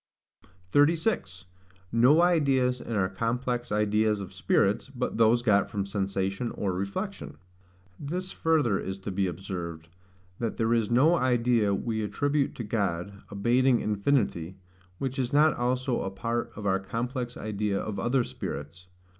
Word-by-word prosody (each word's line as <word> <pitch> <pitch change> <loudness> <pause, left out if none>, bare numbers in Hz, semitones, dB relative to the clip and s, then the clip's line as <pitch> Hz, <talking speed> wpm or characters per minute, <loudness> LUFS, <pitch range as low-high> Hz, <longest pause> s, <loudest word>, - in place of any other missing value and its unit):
36. 145 - +2 0.5
No 130 +9 +5
Ideas 135 -7 +2
in 115 - -5
our 95 -2 +2
complex 120 +5 -2
ideas 105 0 +2
of 95 -1 -7
Spirits, 100 +5 +1
but 125 -4 -3
those 115 +1 +4
got 100 -4 +3
from 100 -2 -2
Sensation 100 +2 -2
or 95 -3 -1
Reflection. 100 - -4 0.6
This 180 +6 -4
further 150 -11 +1
is 95 0 -4
to 100 +1 -6
be 95 0 0
observed, 85 -3 -6 0.5
that 115 -2 -2
there 115 +1 +2
is 115 -3 +1
no 130 +8 +5
idea 120 -5 +2
we 110 +2 -2
attribute 145 +6 0
to 120 - -5
God, 100 -3 -2 0.2
bating 125 +2 +4
infinity, 100 - 0 0.4
which 135 +3 -3
is 125 -2 -1
not 150 +2 +4
also 125 +1 0
a 95 - -2
part 115 +5 -3
of 105 - -7
our 95 -1 +2
complex 120 +5 -4
idea 105 -1 -2
of 105 -2 -4
other 120 +5 +2
spirits. 75 -1 -7
115 Hz, 145 wpm, -28 LUFS, 100-130 Hz, 0.6 s, No